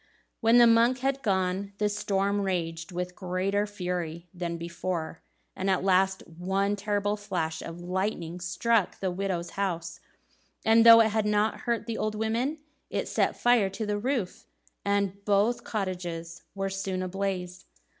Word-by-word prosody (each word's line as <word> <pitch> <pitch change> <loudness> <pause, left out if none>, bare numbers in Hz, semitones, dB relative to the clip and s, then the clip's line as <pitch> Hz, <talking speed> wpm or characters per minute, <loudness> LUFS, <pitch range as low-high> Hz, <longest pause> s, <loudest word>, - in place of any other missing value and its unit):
When 225 +1 +5
the 240 - +8
monk 235 +2 +4
had 270 0 0
gone, 190 -2 0
the 210 - +1
storm 205 -1 0
raged 170 -3 -2
with 180 +1 -4
greater 190 +3 -1
fury 180 -4 -4
than 175 -2 -3
before, 170 -1 -4 0.3
and 190 +1 -1
at 185 -1 +2
last 190 0 +2
one 190 +4 -1
terrible 205 0 0
flash 165 -6 -3
of 165 +1 -8
lightning 180 -1 -2
struck 180 +4 +1
the 190 -2 -1
widows' 180 -2 -2
house, 170 -3 -3 0.7
and 225 +1 +6
though 230 0 +10
it 220 -2 +2
did 220 -1 +1
not 210 +1 +1
hurt 235 -1 0
the 230 -1 -4
old 215 0 -1
women, 230 +7 -1 0.3
it - - -2
set - - +1
fire 240 -5 +4
to 215 +3 -4
the 205 0 -1
roof, 240 -5 -2 0.4
and 200 -1 0
both 210 +4 +2
cottages 175 -5 -4
were 195 0 -2
soon 190 -1 -2
ablaze. 185 -1 -3
195 Hz, 155 wpm, -28 LUFS, 180-210 Hz, 0.7 s, though